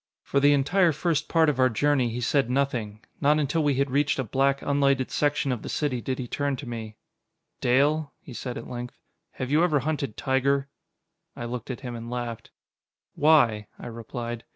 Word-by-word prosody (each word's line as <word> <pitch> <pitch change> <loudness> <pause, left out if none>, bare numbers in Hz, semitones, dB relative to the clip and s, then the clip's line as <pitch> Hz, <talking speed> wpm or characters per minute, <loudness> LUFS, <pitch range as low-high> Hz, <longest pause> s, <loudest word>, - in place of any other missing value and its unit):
For 140 - +1
the 145 +1 +5
entire 165 +5 +3
first 155 0 0
part 165 -1 +4
of 145 -4 +1
our 130 0 +5
journey 135 +1 +2
he 120 +2 -4
said 135 +1 +1
nothing. 120 -6 -1 0.2
Not 150 +1 +4
until 155 +2 +1
we 145 -2 +2
had 140 0 0
reached 140 +1 +2
a 130 - 0
black, 135 +4 +1
unlighted 140 -2 +1
section 145 -2 +1
of 120 -4 -2
the - - -7
city 135 -5 -1
did 130 +1 -3
he 125 - -5
turn 145 +2 -1
to 140 - -8
me. 110 -2 -6 0.6
"Dale," 145 +4 +2
he 130 - -12
said 125 +1 -5
at - - -7
length, 125 0 -6 0.4
"have 130 +1 -4
you 155 +3 +4
ever 155 -6 +2
hunted 140 -5 -2
tiger?" 135 +1 +1 0.7
I 120 - -5
looked 120 +1 -5
at 130 0 -5
him 125 -3 -5
and 115 0 -7
laughed. 120 -2 -5 0.6
"Why?" 120 -9 +4
I - - -10
replied. 115 0 -6
135 Hz, 195 wpm, -26 LUFS, 120-145 Hz, 0.7 s, the